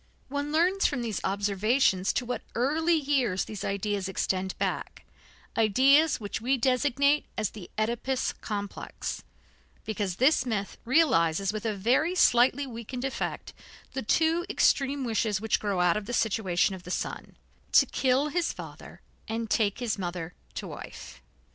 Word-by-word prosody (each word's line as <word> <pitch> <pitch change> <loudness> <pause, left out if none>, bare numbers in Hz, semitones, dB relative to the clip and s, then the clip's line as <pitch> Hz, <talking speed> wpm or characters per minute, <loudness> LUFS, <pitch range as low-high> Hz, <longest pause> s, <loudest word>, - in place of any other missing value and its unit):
One 285 +1 -3
learns 360 +5 +3
from 250 -5 -2
these 220 -5 -3
observations 200 +1 +2
to 250 - -1
what 245 +1 -3
early 315 +7 +2
years 270 - +1
these 210 -3 -7
ideas 200 -1 -2
extend 190 0 -2
back - - -3 0.5
ideas 270 +9 +4
which 210 0 -5
we 260 +4 +1
designate 280 +3 +2
as 215 - -1
the 200 -5 -10
Oedipus 235 +4 -1
complex, 205 -2 -5 0.6
because 205 -4 -2
this 265 - +4
myth 210 -5 -3
realizes 195 - +3
with 215 +1 -3
a 215 - -1
very 255 - +2
slightly 255 -3 +4
weakened 245 +1 -6
effect 270 - -4 0.4
the 265 - -2
two 320 +8 +2
extreme 280 -7 +2
wishes 220 -3 0
which 220 +1 +1
grow 200 -3 -1
out 180 +2 +3
of 210 -1 -5
the 245 - -4
situation 200 -5 +1
of 190 - -7
the 180 - -11
son - - -4 0.4
to - - +7
kill 265 +3 +1
his 345 +2 0
father - - -10 0.3
and 225 -1 -3
take 205 -3 +2
his 235 -5 -2
mother 175 -2 -4 0.2
to - - -4
wife. - - -9
230 Hz, 150 wpm, -28 LUFS, 200-275 Hz, 0.6 s, to